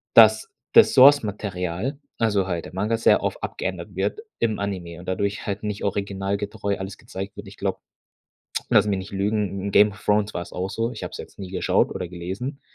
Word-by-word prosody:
dass 110 Hz, -1 st, +7 dB, 0.2 s
das -, -, +7 dB
Source-Material, 105 Hz, -, +3 dB, 0.2 s
also 105 Hz, -5 st, +2 dB
halt 85 Hz, -3 st, -2 dB
der -, -, -10 dB
Manga, 105 Hz, +5 st, 0 dB
sehr 115 Hz, -, +4 dB
oft -, -, -2 dB
abgeändert -, -, -4 dB
wird 435 Hz, -, -1 dB, 0.2 s
im 110 Hz, -2 st, +1 dB
Anime 90 Hz, -4 st, -4 dB
und 90 Hz, -, -12 dB
dadurch 100 Hz, +2 st, -1 dB
halt 100 Hz, 0 st, -2 dB
nicht 105 Hz, -1 st, -3 dB
originalgetreu 100 Hz, +1 st, -2 dB
alles 95 Hz, 0 st, -6 dB
gezeigt 95 Hz, +2 st, -7 dB
wird. 105 Hz, 0 st, -8 dB
Ich 100 Hz, -, -12 dB
glaube, 100 Hz, -1 st, -2 dB, 0.9 s
lass -, -, +5 dB
mich 100 Hz, -2 st, +1 dB
nicht 95 Hz, +3 st, -8 dB
lügen, 100 Hz, -1 st, -1 dB
in -, -, -1 dB
„Game 105 Hz, 0 st, +6 dB
of 105 Hz, -, -15 dB
Thrones“ 105 Hz, 0 st, +2 dB
war's 85 Hz, 0 st, -5 dB
auch 95 Hz, +2 st, -3 dB
so. 115 Hz, +3 st, -1 dB
Ich -, -, -6 dB
hab -, -, -6 dB
es -, -, -7 dB
jetzt -, -, -10 dB
nie 95 Hz, -2 st, -7 dB
geschaut 95 Hz, -, +2 dB
oder 90 Hz, -, -4 dB
gelesen, 95 Hz, -, -5 dB
100 Hz, 200 wpm, -24 LUFS, 95-105 Hz, 0.9 s, dass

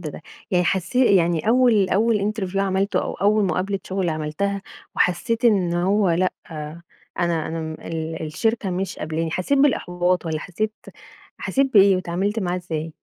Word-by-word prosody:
ده، 155 Hz, -2 st, -7 dB, 0.3 s
يعني 180 Hz, -1 st, +2 dB
حسّي 195 Hz, +5 st, +2 dB
يعني 170 Hz, +2 st, +1 dB
أوّل 230 Hz, -5 st, +4 dB
أوّل 210 Hz, +1 st, +2 dB
interview 195 Hz, -3 st, -4 dB
عملته 195 Hz, 0 st, +1 dB
أو -, -, -4 dB
أوّل 210 Hz, +2 st, +2 dB
مقابلة 190 Hz, +3 st, -1 dB
شغل 190 Hz, -1 st, -2 dB
عملتها، 160 Hz, +6 st, -2 dB, 0.3 s
وحسّيت 225 Hz, +6 st, +1 dB
إنّه 180 Hz, -6 st, +2 dB
هو 200 Hz, -1 st, +3 dB
لأ، 180 Hz, +2 st, +1 dB, 0.9 s
أنا 170 Hz, -2 st, 0 dB
أنا 165 Hz, -, -4 dB, 0.3 s
ال 160 Hz, 0 st, -4 dB
الشركة 210 Hz, +6 st, -1 dB
مش 185 Hz, +1 st, -3 dB
قبلاني، 160 Hz, +1 st, -2 dB
حسّيت 185 Hz, -, 0 dB
بالإحباط، 180 Hz, -10 st, +1 dB
والّا 155 Hz, -1 st, -2 dB
حسّيت 215 Hz, +6 st, -3 dB, 0.7 s
حسّيت 270 Hz, -1 st, 0 dB
بإيه 195 Hz, -2 st, +7 dB
واتعاملت 185 Hz, +4 st, -2 dB
معاه 180 Hz, -2 st, -1 dB
إزاي؟ 165 Hz, -3 st, -4 dB
185 Hz, 145 wpm, -22 LUFS, 170-205 Hz, 0.9 s, بإيه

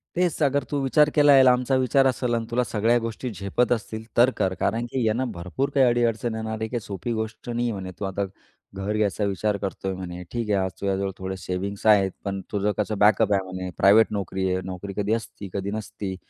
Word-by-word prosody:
तेच 175 Hz, -2 st, 0 dB
अगर 140 Hz, 0 st, +2 dB
तू 145 Hz, -, 0 dB
विचार 150 Hz, +3 st, +4 dB
केला 145 Hz, -1 st, +6 dB
आहे, 135 Hz, -1 st, +8 dB
लांबचा 125 Hz, +1 st, +3 dB
विचार 130 Hz, +1 st, +3 dB
असेल 125 Hz, -2 st, 0 dB
आणि 115 Hz, -1 st, 0 dB
तुला 125 Hz, +1 st, +2 dB
सगळ्या 115 Hz, +1 st, +2 dB
गोष्टी 115 Hz, +2 st, -4 dB
झेपत 100 Hz, +6 st, 0 dB
असतील 110 Hz, -1 st, -2 dB
तर 120 Hz, +2 st, +7 dB
कर, 95 Hz, -1 st, +1 dB
कारण 115 Hz, +4 st, 0 dB
की 130 Hz, -3 st, -1 dB
यांना 115 Hz, +4 st, +1 dB
भरपूर 90 Hz, +10 st, -3 dB
काही 135 Hz, -2 st, +6 dB
अडी-अडचण 120 Hz, -1 st, +1 dB
येणार 110 Hz, 0 st, -3 dB
आहे 110 Hz, -, -1 dB
काही 120 Hz, 0 st, -2 dB
सोपी 100 Hz, +4 st, -5 dB
गोष्ट 110 Hz, +2 st, -5 dB
नाही 120 Hz, 0 st, 0 dB
म्हणे. 95 Hz, -3 st, -5 dB
तू 100 Hz, -, -2 dB
आता 100 Hz, +1 st, -2 dB, 0.5 s
घर 95 Hz, +2 st, -2 dB
घ्यायचा 105 Hz, 0 st, 0 dB
विचार 100 Hz, +1 st, 0 dB
करतोय 95 Hz, -1 st, -4 dB
म्हणे, 90 Hz, -1 st, -6 dB
ठीक 115 Hz, -3 st, -3 dB
आहे. 100 Hz, -, +3 dB
आज 95 Hz, -, -3 dB
तुझ्याजवळ 95 Hz, 0 st, -1 dB
थोडे 95 Hz, 0 st, -4 dB
सेविंग्स 95 Hz, +3 st, -4 dB
आहेत, 100 Hz, -3 st, +5 dB
पण 100 Hz, -1 st, -3 dB
तुझं 105 Hz, 0 st, +1 dB
कसं 105 Hz, 0 st, -1 dB
बॅकअप 105 Hz, 0 st, +4 dB
आहे 100 Hz, -, +2 dB
म्हणे, 95 Hz, 0 st, -6 dB
प्रायव्हेट 105 Hz, +4 st, +6 dB
नोकरी 95 Hz, -2 st, -2 dB
आहे. 95 Hz, -, -1 dB
नोकरी 95 Hz, +1 st, -6 dB
कधी 105 Hz, +1 st, +1 dB
असती, 110 Hz, -3 st, -5 dB
कधी 100 Hz, 0 st, -3 dB
नसती. 105 Hz, -2 st, -5 dB
105 Hz, 215 wpm, -24 LUFS, 95-120 Hz, 0.5 s, आहे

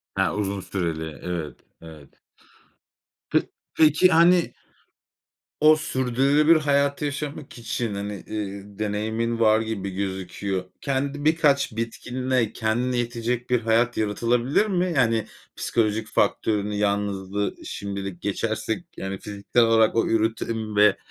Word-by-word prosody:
Ha, -, -, +1 dB
uzun 100 Hz, -1 st, -2 dB
süreli, 80 Hz, -5 st, -4 dB
evet, 85 Hz, -6 st, -4 dB, 0.3 s
evet. 80 Hz, -4 st, -12 dB, 1.2 s
Pe -, -, +3 dB, 0.3 s
peki 155 Hz, +3 st, +5 dB
hani 170 Hz, +1 st, +4 dB, 1.1 s
o 155 Hz, +1 st, +7 dB
sürdürülebilir 140 Hz, +4 st, +3 dB
hayatı 140 Hz, -1 st, +1 dB
yaşamak 145 Hz, -1 st, -5 dB
için 115 Hz, -1 st, -3 dB
hani, 100 Hz, +1 st, -4 dB, 0.2 s
ııı, 100 Hz, -1 st, -6 dB
deneyimin 110 Hz, +2 st, -1 dB
var 110 Hz, -1 st, +5 dB
gibi 110 Hz, -3 st, -3 dB
gözüküyor. 95 Hz, 0 st, -3 dB, 0.2 s
Kendi 140 Hz, +1 st, -2 dB
birkaç 150 Hz, -4 st, +3 dB
bitkinle 125 Hz, +1 st, -1 dB
kendine 120 Hz, +3 st, -1 dB
yetecek 120 Hz, +1 st, -2 dB
bir 125 Hz, -1 st, +3 dB
hayat 115 Hz, +2 st, +2 dB
yaratılabilir 120 Hz, -, +1 dB
mi? 185 Hz, -3 st, 0 dB
Yani 115 Hz, -4 st, +2 dB, 0.3 s
psikolojik 110 Hz, -1 st, 0 dB
faktörünü 105 Hz, -2 st, 0 dB
yalnızlığı 100 Hz, -1 st, -1 dB
şimdilik 100 Hz, -3 st, -5 dB
geçersek, 110 Hz, -, -2 dB
yani 95 Hz, 0 st, -4 dB
fiziksel 105 Hz, +4 st, 0 dB
olarak 115 Hz, -1 st, +4 dB
o 115 Hz, -, +3 dB
üretim 110 Hz, -1 st, -1 dB
ve 105 Hz, -1 st, +5 dB
110 Hz, 115 wpm, -24 LUFS, 100-130 Hz, 1.2 s, o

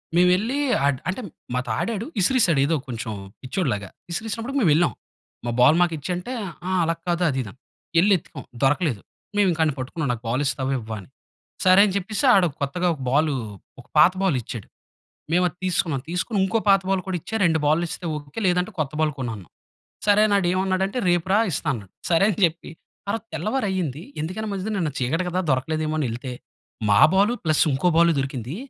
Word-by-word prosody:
మేము 180 Hz, +1 st, +5 dB
ఎళ్లి, 240 Hz, +8 st, -1 dB, 0.3 s
అట్ 135 Hz, -2 st, 0 dB
అంటే, 190 Hz, +7 st, -3 dB, 0.3 s
మాతో 125 Hz, +1 st, -2 dB
ఆడాడు, 225 Hz, -1 st, -2 dB
విసిరేసాడు. 185 Hz, -, +3 dB
ఏదో 160 Hz, +3 st, +1 dB
కొంచెం 115 Hz, -2 st, -5 dB, 0.3 s
పిచ్చోడిలాగా. 115 Hz, -, -2 dB, 0.2 s
విసిరేసినప్పుడుకీ, 225 Hz, +8 st, -3 dB
మేము 170 Hz, -, +4 dB
వెళ్ళాం. 170 Hz, +3 st, +3 dB, 0.5 s
"మా 120 Hz, -, -1 dB
బాల్ 145 Hz, +6 st, +6 dB
మాకు 175 Hz, -1 st, +2 dB
ఇచ్చేయ్" 175 Hz, +5 st, -3 dB
అంటే, 200 Hz, +9 st, -6 dB, 0.4 s
ఆహ్, 185 Hz, -1 st, +1 dB
అలా 165 Hz, 0 st, 0 dB
కాదు, 175 Hz, +1 st, +1 dB
అది, 135 Hz, -, -2 dB
ఇది 105 Hz, -, -8 dB
అని. 130 Hz, -, -29 dB, 0.4 s
ఎళ్లి 200 Hz, +3 st, +5 dB
ఎతికాం 150 Hz, -4 st, -11 dB, 0.2 s
దొరకలేదు. 135 Hz, -, +1 dB, 0.4 s
మేము 205 Hz, -, +4 dB
ఇంకా 165 Hz, -1 st, -1 dB
ఆడిని 150 Hz, -3 st, 0 dB
పట్టుకున్నాం. 140 Hz, +3 st, -3 dB
"నాకు 120 Hz, 0 st, -8 dB
బాల్ 130 Hz, +5 st, 0 dB
ఇస్తావా, 130 Hz, 0 st, -1 dB
ఇవ్వవా?" 110 Hz, -1 st, -6 dB
అని. 95 Hz, -, -17 dB, 0.6 s
సరే 185 Hz, +1 st, +7 dB
అని 200 Hz, -, -1 dB
చెప్పేసి, 200 Hz, +5 st, -2 dB
ఆడు 185 Hz, -3 st, +4 dB
కొత్తగా 175 Hz, +6 st, 0 dB
ఒక 140 Hz, -, -12 dB
బాల్ 150 Hz, +2 st, +3 dB, 0.5 s
ఒక -, -, -22 dB
పాత 175 Hz, +4 st, +7 dB
బాల్ 165 Hz, -9 st, +2 dB
ఇచ్చాడు. 115 Hz, -3 st, -7 dB, 0.7 s
మేము 180 Hz, +2 st, +4 dB
అది 175 Hz, -, -14 dB
తీసుకున్నాం. 170 Hz, -6 st, 0 dB
తీసుకొని, 180 Hz, +5 st, -1 dB
ఇంకో 220 Hz, +4 st, +1 dB
పాత 195 Hz, 0 st, +6 dB
బాల్ 195 Hz, -1 st, +2 dB
కూడా 185 Hz, -, -1 dB
ఇచ్చా. 220 Hz, -, -7 dB
2 160 Hz, -2 st, +3 dB
బాల్లు 155 Hz, +4 st, +3 dB
ఇస్తే 180 Hz, -, -6 dB
ఓకె. 145 Hz, +6 st, -7 dB
లేదంటే 180 Hz, +2 st, +1 dB
కొత్త 145 Hz, -4 st, -1 dB
బాల్ 155 Hz, -1 st, +2 dB
కొను, 125 Hz, -3 st, -3 dB
అన్నాం. 95 Hz, -5 st, -13 dB, 0.6 s
సరే 205 Hz, 0 st, +5 dB
అని, 205 Hz, -, +1 dB
ఆడు 185 Hz, -, +1 dB
ఏమన్నాడంటే, 190 Hz, +3 st, 0 dB
"రేపు 175 Hz, 0 st, +1 dB
రా! 205 Hz, -, +5 dB
ఇస్తాను" 150 Hz, +1 st, -2 dB
అన్నాడు. 95 Hz, -1 st, -18 dB, 0.2 s
సరే 175 Hz, +3 st, +4 dB
అని 195 Hz, -, -5 dB
చెప్పి, 170 Hz, 0 st, -4 dB, 0.4 s
ఆరోజు 225 Hz, +1 st, -2 dB
తెల్లవారి 215 Hz, -, -1 dB
అయింది. 165 Hz, -5 st, -3 dB, 0.2 s
ఎందుకైనా 185 Hz, +8 st, -4 dB
మంచిది 195 Hz, +2 st, -3 dB
అని, 210 Hz, -, -1 dB
నిన్న 160 Hz, -4 st, -1 dB
చీకటి 150 Hz, +9 st, 0 dB
కదా 180 Hz, +1 st, -1 dB
దొరకలేదేమో 155 Hz, +4 st, 0 dB
అని 140 Hz, -, 0 dB
ఎళ్తే, 125 Hz, +2 st, -5 dB, 0.6 s
మా 100 Hz, -, +5 dB
బాల్, 200 Hz, +5 st, +4 dB
ప్లస్ 155 Hz, -3 st, +2 dB
ఇంకో 155 Hz, +7 st, +2 dB
బాల్ 170 Hz, 0 st, +6 dB
దొరికింది. 135 Hz, 0 st, -4 dB
170 Hz, 195 wpm, -23 LUFS, 135-190 Hz, 0.7 s, సరే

